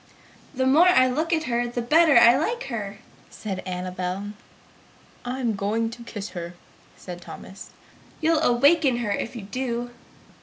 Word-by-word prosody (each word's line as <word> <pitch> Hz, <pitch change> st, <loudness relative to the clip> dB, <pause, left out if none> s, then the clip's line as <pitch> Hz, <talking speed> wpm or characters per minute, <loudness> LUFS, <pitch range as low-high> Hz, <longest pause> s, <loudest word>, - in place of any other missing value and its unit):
"The 260 Hz, 0 st, 0 dB
more 305 Hz, +7 st, +5 dB
I 255 Hz, -8 st, +5 dB
look 310 Hz, +7 st, -1 dB
at 320 Hz, -2 st, +1 dB
her, 240 Hz, -3 st, -1 dB
the 240 Hz, 0 st, -4 dB
better 310 Hz, +2 st, +5 dB
I 235 Hz, +1 st, +8 dB
like 465 Hz, -, -1 dB
her!" 205 Hz, -4 st, -5 dB, 0.3 s
said 195 Hz, -3 st, -6 dB
Annabel. 185 Hz, +2 st, -4 dB, 0.9 s
"I 250 Hz, +2 st, -4 dB
am 235 Hz, -4 st, 0 dB
going 220 Hz, +3 st, -1 dB
to 235 Hz, +1 st, -10 dB
kiss 210 Hz, -3 st, -7 dB
her!" 175 Hz, -1 st, -7 dB, 0.4 s
said 180 Hz, -1 st, -9 dB
Thomas. 190 Hz, +2 st, -11 dB, 0.5 s
"You'll 320 Hz, 0 st, +2 dB
awaken 280 Hz, +1 st, +4 dB
her 235 Hz, -4 st, -2 dB
if 230 Hz, -, -3 dB
you 230 Hz, -, -7 dB
do!" 240 Hz, +3 st, -4 dB
240 Hz, 155 wpm, -24 LUFS, 200-270 Hz, 0.9 s, I